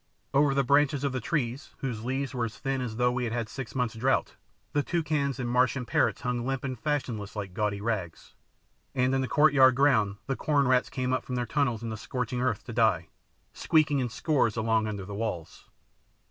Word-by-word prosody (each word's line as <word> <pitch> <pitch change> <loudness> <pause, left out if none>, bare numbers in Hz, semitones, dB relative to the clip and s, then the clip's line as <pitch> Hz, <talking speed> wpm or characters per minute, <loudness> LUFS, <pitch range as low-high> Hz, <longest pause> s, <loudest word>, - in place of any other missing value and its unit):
Over 140 0 +4
the 140 - +3
branches 140 +1 +3
of 140 - +1
the 130 - -2
trees, 135 -1 -2
whose 115 -5 -4
leaves 135 +2 -2
were 120 -3 -1
as 115 - -7
thin 135 -1 -2
as 120 -3 -4
though 125 +1 +2
we 125 0 -1
had 115 - -3
had 120 -1 -1
a - - -20
six 125 -6 -7
months' 125 -3 0
drought, 125 +4 0 0.4
the 145 - +3
toucans 150 -4 -1
and 125 - -2
Martian 125 +1 +2
parrots 110 -3 +1
hung 125 -1 -1
limp 135 0 -2
and 130 -2 -3
fashionless 120 -9 -2
like 100 -3 -5
gaudy 105 0 -1
rags, 100 -7 -4 0.6
and 130 0 +2
in 135 - +2
the 130 - -1
courtyard 135 -2 +5
ground 125 -8 +3
the 135 - -1
corn 145 -1 +1
rats 125 0 +3
came 130 0 -2
up 130 - 0
from 125 - -4
their 120 -1 -1
tunnels 120 -2 0
in 115 - -3
the 110 - -4
scorching 125 +1 -3
earth 115 -4 0
to 120 - -8
die, 110 -8 +2 0.4
squeaking 150 -3 +2
in 125 -2 -1
scores 125 -3 +1
along 110 0 +1
under 100 -3 -4
the 100 - -7
walls. 100 -6 -5
125 Hz, 215 wpm, -28 LUFS, 110-135 Hz, 0.6 s, courtyard